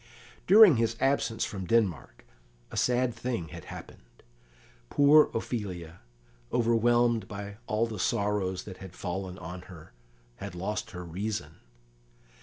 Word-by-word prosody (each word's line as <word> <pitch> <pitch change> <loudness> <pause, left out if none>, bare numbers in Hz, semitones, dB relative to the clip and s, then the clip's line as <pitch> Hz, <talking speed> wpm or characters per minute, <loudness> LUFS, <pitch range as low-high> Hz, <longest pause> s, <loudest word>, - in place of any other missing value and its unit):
During 200 - +8
his 115 0 +1
absence 135 -4 +1
from 95 -3 -5
Denmark 90 - 0 0.5
a - - -8
sad 125 0 +2
thing 115 -8 -4
had - - -10
happened. - - -12 0.7
Poor 145 +2 +6
Ophelia, 90 -8 -4 0.5
overwhelmed 120 -2 +2
by 100 0 -7
all 110 +2 +1
the 110 -3 -6
sorrows 100 -3 0
that 95 -3 -9
had 95 -2 -11
fallen 90 0 -4
on 90 +2 -7
her, 80 -4 -13 0.4
had 85 - -7
lost 105 +6 -3
her 90 -4 -7
reason. 100 +6 -4
105 Hz, 125 wpm, -29 LUFS, 90-115 Hz, 0.7 s, During